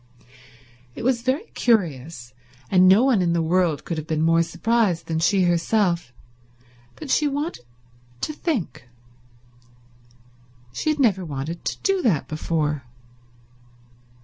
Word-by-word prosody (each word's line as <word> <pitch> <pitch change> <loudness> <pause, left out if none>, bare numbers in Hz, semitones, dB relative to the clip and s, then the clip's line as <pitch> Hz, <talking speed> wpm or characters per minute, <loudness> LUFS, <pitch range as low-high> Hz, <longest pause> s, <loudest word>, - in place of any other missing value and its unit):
It - - -7
was 245 -1 +1
very 260 - 0
curious, 155 - -1 0.4
and 185 -1 +6
no 195 +6 +6
one 255 -7 +3
in 170 -1 +1
the 170 - +1
world 165 -3 +1
could 165 -2 -3
have 155 - -8
been 155 -2 0
more 165 +1 +4
surprised 205 +1 0
than 160 -1 -2
she 185 +3 +2
herself, 175 - +1 0.8
but 300 -4 -7
she 300 - +3
wanted 290 - -4 0.6
to 305 - -2
think. 255 - -4 1.8
She 310 - -2
had 305 - +1
never 205 -8 +2
wanted 155 +2 -5
to - - -2
do 390 -1 +1
that 160 - +1
before. 155 -1 -2
175 Hz, 130 wpm, -23 LUFS, 160-235 Hz, 1.8 s, and